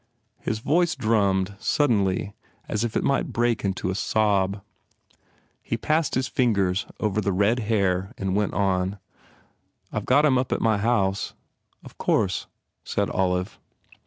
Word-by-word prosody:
His 110 - -2
voice 160 +8 +1
drummed 100 -3 +1
suddenly 105 -8 +1 0.3
as 110 +1 -1
if 115 -2 -1
it - - 0
might 140 - +1
break 120 -1 0
into 95 -1 -1
a - - -1
sob. 100 -1 +1 1.0
He 115 - -3
passed 155 +5 0
his 130 0 0
fingers 100 -7 +1
over 105 -1 0
the 100 0 0
red 100 +6 +2
hair 100 -3 0
and 95 -1 -2
went 105 -1 0
on, 95 0 0 1.0
"I - - 0
ve - - -9
got 145 +4 +4
him 130 -4 +4
up 130 - -2
at - - +1
my 110 -2 +2
house." 100 -3 0 0.5
"Of - - -14
course," - - +1 0.4
said - - -1
Olive. 90 0 -1
105 Hz, 150 wpm, -25 LUFS, 95-120 Hz, 1.0 s, got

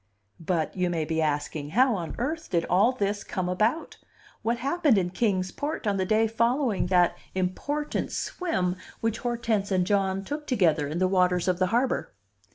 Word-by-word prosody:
But 165 -2 -1
(you 180 -1 0
may 165 -3 -1
be 160 +1 -1
asking) 150 -1 -2
how 260 -1 +5
on 175 -5 -4
earth 315 +6 -3
did 170 -1 +1
all 200 +7 +4
this 205 -4 -2
come 185 -1 -3
about? 215 - 0 0.4
What 235 +1 0
happened 280 -1 +2
in 180 -2 0
Kings 185 -3 0
Port 295 - -4
on 200 -2 +1
the 190 -1 0
day 220 +2 +3
following 230 -1 +1
that 180 -1 +3 0.2
important 285 +12 -2
swim 185 - -2 0.2
which 225 0 -1
Hortense 230 -4 -1
and 185 -2 +2
John 195 -1 +1
took 295 +4 -5
together 165 - +2
in 155 +3 -4
the 185 +1 +2
waters 180 -1 +2
of 180 -1 +1
the 185 - +3
harbor? 240 - 0
195 Hz, 175 wpm, -27 LUFS, 180-240 Hz, 0.4 s, how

